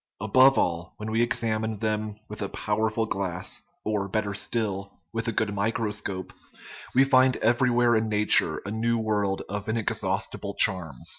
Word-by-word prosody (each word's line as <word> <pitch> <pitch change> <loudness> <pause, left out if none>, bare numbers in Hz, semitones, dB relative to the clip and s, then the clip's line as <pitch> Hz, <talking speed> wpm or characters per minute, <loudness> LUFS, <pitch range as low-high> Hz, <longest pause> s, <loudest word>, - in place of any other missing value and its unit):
Above 130 +6 +5
all, 85 +1 -1
when 105 +1 -5
we 115 +1 +2
examine 110 -3 0
them 105 0 -2
with 105 - -6
a 100 - -2
powerful 110 +1 -1
glass 95 -4 -2 0.2
or, 105 -2 -1
better 100 +1 -2
still, 100 -1 -3 0.2
with 115 +1 -2
a - - +1
good 105 -1 -1
microscope, 100 -2 -2 0.6
we 130 - +7
find 130 -1 +4
every 120 +3 +2
where 120 -1 +3
in 110 0 +1
nature 105 0 +3
a 100 - -4
new 115 +2 0
world 105 -3 -1
of 105 +2 -5
inexhaustible 110 -1 -1
charms. 80 -9 +1
110 Hz, 155 wpm, -26 LUFS, 100-115 Hz, 0.6 s, we